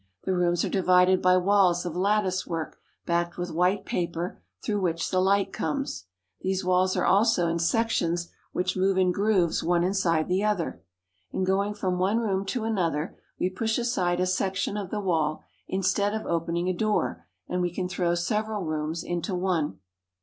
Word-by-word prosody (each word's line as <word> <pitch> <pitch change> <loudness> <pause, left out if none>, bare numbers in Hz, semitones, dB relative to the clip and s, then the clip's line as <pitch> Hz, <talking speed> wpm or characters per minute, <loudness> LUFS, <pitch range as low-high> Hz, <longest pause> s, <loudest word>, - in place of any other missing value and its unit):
The 190 - 0
rooms 175 -1 +1
are - - -2
di 195 - 0
vided 180 0 +4
by 185 0 +5
walls 185 -2 +3
of 175 -2 -4
latticework 185 -4 -1 0.3
backed 170 0 0
with 175 -1 -3
white 180 +5 +1
paper, 170 - -3 0.2
through 205 -1 0
which 165 -2 -1
the 185 - +2
light 195 +1 +2
comes. 275 - -3 0.4
These 190 0 -1
walls 185 +1 +2
are - - +1
also 200 -3 +3
in 165 0 0
sections 170 -3 0 0.2
which 180 +1 -1
move 190 0 +2
in 185 -1 +3
grooves 195 -3 +2
one 175 0 +2
inside 175 -4 +1
the 185 +3 +1
other. 205 - -1 0.5
In 190 - -2
going 200 +2 +1
from 185 -3 -1
one 195 +4 +2
room 195 -4 -1
to 240 +2 -2
another, 175 -8 -1 0.2
we 185 - 0
push 220 +4 -1
aside 190 -8 0
a 185 - +2
section 190 +2 -1
of 205 -3 -4
the 210 - -2
wall 160 -6 0 0.2
instead 200 +2 0
of 220 - -4
opening 170 +1 -1
a 185 - +1
door, 215 +3 -1 0.2
and 180 0 -1
we 175 -1 0
can 180 +1 -3
throw 175 -1 0
several 210 +3 -1
rooms 155 0 -3
into 175 +2 -2
one. 180 -4 0
185 Hz, 180 wpm, -27 LUFS, 175-200 Hz, 0.5 s, by